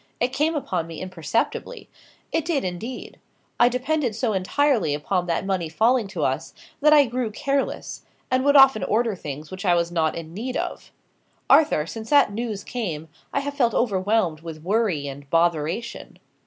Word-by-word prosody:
"It 250 +2 0
came 305 +4 +1
upon 180 - -2
me 165 -2 -8
imperceptibly; 185 - -3 0.4
it 325 - 0
did, 320 -3 0
indeed. 200 +8 -6 0.4
I 240 - +6
depended 255 -1 -1
so 225 -1 0
entirely 200 - +1
upon 180 +4 -1
that 170 +2 -1
money 185 -4 -1
falling 225 +6 +2
to 185 -6 -4
us, 135 +5 -2 0.2
that 300 +1 +4
I 295 -2 +7
grew 245 -1 -2
careless, 275 +6 -2 0.3
and 255 0 +2
would 285 +1 +4
often 270 -5 +7
order 225 0 +1
things 150 -2 -7
which 190 +2 -7
I 180 -3 +4
was 170 0 0
not 160 -2 +1
in 165 -1 -7
need 245 +7 -4
of. - - -5 0.6
Arthur, 295 - +5
since 220 +6 -7
that 285 -8 +5
news 220 -2 -4
came, 165 -10 -4 0.2
I 280 - 0
have 285 0 -4
felt 245 -6 +1
overwhelmed 195 -6 +1
with 160 -2 -8
worry 190 -7 0
and 140 0 -9
botheration." 170 +6 -1
210 Hz, 170 wpm, -24 LUFS, 165-255 Hz, 0.6 s, I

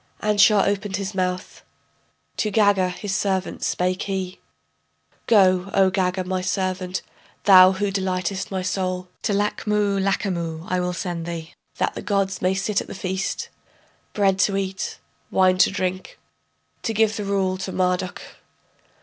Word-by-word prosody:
] - - -25
Anshar 210 -1 +5
opened 200 0 -1
his 195 0 -4
mouth, 185 -1 -3 0.8
To 215 - 0
Gaga, 200 -3 +3
his 195 +2 -4
servant, 190 -2 -1
spake 185 +1 0
he: 190 -2 -3 0.9
Go, 190 -3 +4
O 190 -1 +4
Gaga, 185 -1 0
my 185 0 -2
servant 185 -1 -2 0.4
thou 185 -1 +8
who 200 +1 -1
delightest 190 0 -2
my 190 -1 -3
soul, 185 -1 -2
To - - -1
Lachmu 205 0 0
Lachamu 170 -4 -2
I 185 - 0
will 180 0 -1
send 175 -1 -4
thee... 165 -1 -6 0.2
That - - 0
the - - -6
gods 195 -2 -1
may 185 +1 +2
sit 200 +1 0
at - - -9
the - - -8
feast, 190 0 -3 0.6
Bread 195 -2 +2
to 195 +1 +2
eat, 190 -1 -3 0.3
wine 185 -1 +3
to 185 - +6
drink, 185 -1 -3 0.6
To 225 - -2
give 220 0 +3
the 210 - -3
rule 190 -2 0
to 190 0 -5
Marduk. 180 0 -1
190 Hz, 150 wpm, -23 LUFS, 185-200 Hz, 0.9 s, thou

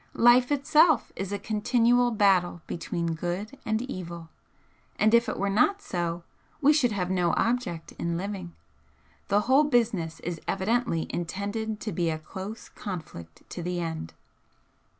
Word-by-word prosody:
Life 245 +2 +6
itself 295 0 +4
is 195 0 -4
a 205 - -1
continual 240 +3 +2
battle 190 -6 +2
between 170 0 -3
good 180 - -4
and 220 +2 0
evil, 170 -9 -7 0.7
and 215 +1 +3
if 235 +1 +5
it - - -3
were 200 - -1
not 245 - +3
so 175 - -3 0.4
we 295 +1 +5
should 265 -6 +3
have 185 -3 -2
no 175 -3 +2
object 230 -9 -1
in 170 0 -1
living. 185 -2 -5 0.7
The 205 +1 +3
whole 265 +7 +4
business 210 - +1
is 170 -2 -5
evidently 220 -4 0
intended 205 +5 -3
to 215 - -3
be 170 -2 0
a 160 - -1 0.2
dose 200 +4 -6
conflict 155 - -8
to 175 - -5
the 175 +1 -2
end." 160 - -4
200 Hz, 150 wpm, -27 LUFS, 175-240 Hz, 0.7 s, Life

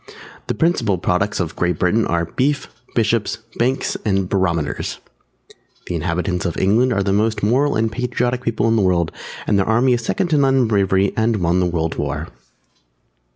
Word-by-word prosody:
The - - -1
principal 120 - +1
products 95 +4 0
of 85 -3 -2
Great 90 -2 0
Britain 105 +7 +2
are 85 0 0
Beef, 140 - -1 0.3
Bishops, 110 -1 +1 0.2
Banks, 130 +3 0
and 95 -3 0
Barometers. 85 -6 -1 0.9
The - - -4
inhabitants 90 +2 -1
of 85 -3 -2
England 115 +7 +3
are 100 -4 +1
the 95 0 0
most 110 +1 0
Moral 130 +7 +2
and 110 0 +1
Patriotic 125 +1 -1
people 115 -2 0
in 115 - +3
the - - +3
World, 85 -3 +1 0.3
and 100 - +2
their 100 - 0
army 120 +3 +3
is 120 -1 -1
second 185 +8 -1
to 150 -2 +3
none 135 -1 +3
in 125 -3 +3
bravery 100 -2 +2
and 110 +1 +1
won 90 -2 +1
the 90 - +2
World 80 -2 -2
War. 70 -1 -3
105 Hz, 180 wpm, -20 LUFS, 90-120 Hz, 0.9 s, England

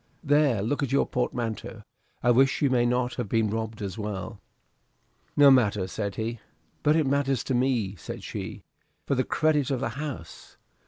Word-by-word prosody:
There 145 -8 +3
look 145 +7 -1
at 140 -3 -1
your 140 - +3
portmanteau. 120 -3 -3 0.4
I 120 - +5
wish 135 +4 +3
you 140 - +3
may 120 -1 +3
not 125 0 0
have 120 -5 -3
been 110 -1 +1
robbed 110 -1 -4
as 95 +2 -5
well." 105 +1 -5 1.0
"No 145 -1 +8
matter," 105 -7 +3
said 100 +1 -4
he. 115 +1 -3 0.4
"But 150 +1 +3
it 160 -2 +3
matters 135 -2 +1
to 135 - -2
me," 120 -6 +1
said - - -8
she, - - -6 0.4
"for - - 0
the 130 -1 +2
credit 150 -2 +1
of 135 -3 0
the 135 - -1
house." 140 - -7
125 Hz, 175 wpm, -27 LUFS, 110-140 Hz, 1.0 s, No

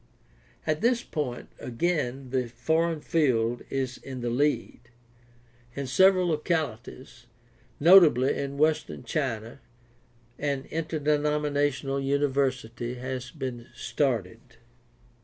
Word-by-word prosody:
At 155 -1 0
this 235 +1 +2
point 130 -6 -4
again 130 -1 -2
the 130 -2 0
foreign 160 +7 0
field 120 -8 +1
is 130 -2 -2
in 130 -2 -7
the 120 0 -1
lead. 130 -2 -1 0.9
In 140 - -3
several 185 +6 +4
localities, 135 -6 -3 0.5
notably 155 -6 +6
in 140 0 -4
Western 155 +1 +1
China, 120 -6 -3 0.8
an 140 -2 -2
interdenominational 150 -3 0
university 130 -4 -1
has 130 0 -5
been 130 -5 -6
started. 115 -7 -1
140 Hz, 95 wpm, -27 LUFS, 125-155 Hz, 0.9 s, notably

